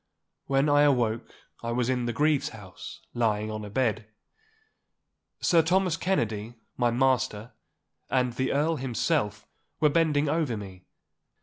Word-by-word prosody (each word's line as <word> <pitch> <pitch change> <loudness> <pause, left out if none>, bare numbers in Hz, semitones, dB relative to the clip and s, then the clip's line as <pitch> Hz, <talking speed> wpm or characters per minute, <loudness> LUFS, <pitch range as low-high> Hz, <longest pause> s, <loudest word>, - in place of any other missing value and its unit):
When 135 +1 +2
I 145 0 +5
awoke 120 -6 +2 0.3
I 115 - -3
was 120 0 0
in 125 -2 0
the - - 0
Grieve's 150 +4 +1
house, 100 -5 -10
lying 110 -2 0
on 110 0 -5
a 105 - -7
bed. 110 -2 0 1.3
Sir 170 -2 +5
Thomas 180 +1 +2
Kennedy, 115 - -1 0.2
my 120 -1 +2
master, 120 -3 +1 0.6
and 125 -2 +1
the 130 +2 -1
Earl 155 +3 +1
himself 120 -5 -1 0.3
were 150 - +4
bending 150 -2 +2
over 145 -6 0
me. 95 -3 -10
125 Hz, 135 wpm, -27 LUFS, 110-145 Hz, 1.3 s, I